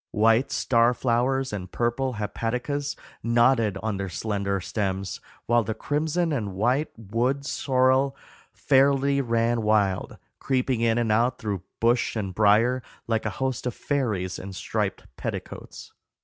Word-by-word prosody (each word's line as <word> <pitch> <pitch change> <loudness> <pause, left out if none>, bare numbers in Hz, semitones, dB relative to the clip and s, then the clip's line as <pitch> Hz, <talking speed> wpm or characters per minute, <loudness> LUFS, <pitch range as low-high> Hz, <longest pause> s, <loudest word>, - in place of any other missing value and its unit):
White 115 +5 +3
star 120 -1 +3
flowers 130 +1 0
and 90 -3 -5
purple 120 +2 0
hepaticas 125 +7 -2 0.3
nodded 115 -3 +3
on 110 -3 -1
their 100 -1 -3
slender 100 +1 -2
stems, 95 -1 -3 0.2
while 120 0 +3
the 110 +1 -3
crimson 160 +6 0
and 105 -8 -3
white 125 +9 +1
wood 120 +6 -1
sorrel 130 0 +2 0.3
fairly 140 +1 +3
ran 115 -1 +1
wild, 105 -3 +1 0.2
creeping 130 -2 0
in 115 -1 +2
and 115 -2 +1
out 115 +3 +2
through 100 -4 -3 0.2
bush 120 +1 +2
and 100 -4 -3
brier, 110 +5 +4 0.2
like 110 -1 0
a 105 - -5
host 130 -2 -2
of 125 - -3
fairies 110 -11 -1
in 95 +1 -7
striped 90 - -3
petticoats. - - -7
115 Hz, 135 wpm, -25 LUFS, 105-130 Hz, 0.3 s, brier